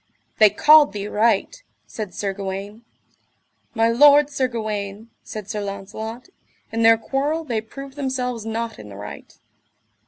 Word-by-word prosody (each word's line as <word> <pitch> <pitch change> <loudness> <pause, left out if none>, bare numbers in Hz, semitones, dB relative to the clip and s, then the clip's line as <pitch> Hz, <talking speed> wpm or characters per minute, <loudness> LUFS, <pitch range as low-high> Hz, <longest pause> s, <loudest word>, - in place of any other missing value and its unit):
They 215 -1 +8
called 295 +4 +6
thee 205 0 -4
right, 230 - +1 0.2
said 210 -5 -7
Sir 200 -1 -2
Gawaine. 200 +3 -6 0.9
My 225 0 +3
lord 290 +4 +6
Sir 265 -2 0
Gawaine, 215 -2 -5
said 215 -3 -8
Sir 210 -1 -4
Launcelot, 205 +4 -7 0.4
in 225 - -2
their 225 0 +6
quarrel 280 +7 -2
they 235 -7 -2
proved 275 +4 -10
themselves 250 -4 -2
not 225 0 -4
in 105 - -10
the 100 - -10
right. 105 +1 -10
225 Hz, 145 wpm, -22 LUFS, 205-260 Hz, 0.9 s, They